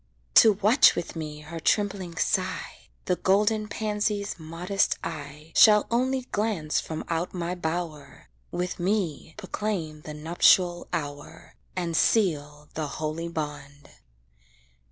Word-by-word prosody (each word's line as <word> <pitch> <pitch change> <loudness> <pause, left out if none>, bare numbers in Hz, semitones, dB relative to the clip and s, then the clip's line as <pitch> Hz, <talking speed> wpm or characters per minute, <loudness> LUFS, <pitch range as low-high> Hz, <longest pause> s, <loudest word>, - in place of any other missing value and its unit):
To 220 - +8
watch 210 +6 +5
with 175 - -4
me 150 -2 -6
her 160 +2 -7
trembling 190 -2 0
sigh, 185 +1 -2 0.2
The 180 - +1
golden 210 +2 +2
pansy's 210 -2 -2
modest 175 +5 -1
eye 150 0 -7
Shall 210 -1 +7
only 260 +2 +1
glance 205 -8 0
from 160 -1 -5
out 165 +3 -2
my 175 0 -2
bower, 165 -3 -5 0.2
With 180 +1 -3
me 175 -5 -1
proclaim 190 -6 -4
the 150 0 -8
nuptial 175 +3 +3
hour, 145 +1 -6 0.2
And 175 -3 -2
seal 150 -7 +1
the 155 -1 -3
holy 155 +2 -3
bond. 145 -3 -6
170 Hz, 120 wpm, -26 LUFS, 155-200 Hz, 0.2 s, To